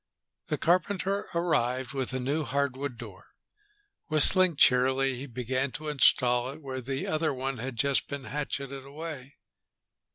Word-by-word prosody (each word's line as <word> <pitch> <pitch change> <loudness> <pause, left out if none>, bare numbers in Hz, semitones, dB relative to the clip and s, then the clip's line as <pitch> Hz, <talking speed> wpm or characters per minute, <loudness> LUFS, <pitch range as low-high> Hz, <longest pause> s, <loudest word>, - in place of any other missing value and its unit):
The - - -1
carpenter 190 +3 +1
arrived 130 -7 0
with 135 -2 -2
a 130 - -2
new 140 +5 -1
hardwood 140 -2 -2
door. - - -11 0.8
Whistling 170 +3 +5
cheerily, 130 0 +4
he 130 +3 -7
began 130 +2 -2
to 155 0 -5
install 125 -3 +3
it 140 +3 -8
where 130 -3 -6
the 135 +2 -3
other 155 0 0
one 135 -1 -3
had 130 +1 -5
just 140 +3 +1
been 140 -1 -6
hatcheted 140 -1 -4
away. 140 -1 -8
135 Hz, 140 wpm, -28 LUFS, 130-150 Hz, 0.8 s, Whistling